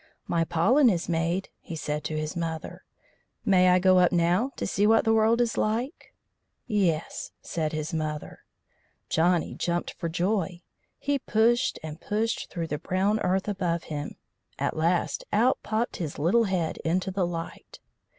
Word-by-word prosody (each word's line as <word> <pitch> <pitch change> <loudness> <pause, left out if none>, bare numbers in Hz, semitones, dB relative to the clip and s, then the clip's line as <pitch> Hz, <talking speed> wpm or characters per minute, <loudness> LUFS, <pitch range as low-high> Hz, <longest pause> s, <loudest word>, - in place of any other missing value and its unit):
"My 170 -1 +1
pollen 235 - +4
is 175 -5 -1
made," 170 +3 -1
he 165 - -8
said 150 -1 -3
to 155 - -2
his 155 +3 -3
mother. 165 -2 -4 0.6
"May 185 -2 +5
I 180 - +6
go 185 0 +5
up 180 -1 +4
now 175 +8 +2
to - - -3
see 205 +1 +2
what 225 +1 +4
the 225 - +4
world 225 +1 +3
is 235 -1 +1
like?" 235 +8 -2 0.5
"Yes," 185 -8 -1
said 155 -2 -3
his 155 0 -4
mother. 155 -1 -4 0.7
Johnny 170 +1 +2
jumped 175 0 -2
for 170 - -4
joy. 180 0 -1 0.3
He 285 0 -1
pushed 235 +1 +2
and 160 +1 -7
pushed 220 +2 -1
through 170 -3 -3
the 150 - -2
brown 195 +5 +1
earth 190 +1 0
above 180 -4 -1
him; 145 0 -4 0.4
at - - -1
last 170 +3 0
out 240 +5 +3
popped 220 +2 -2
his 160 -5 -4
little 190 +10 +3
head 180 -5 -1
into 185 +3 0
the 185 -2 0
light. 165 -1 -7
180 Hz, 160 wpm, -27 LUFS, 165-215 Hz, 0.7 s, I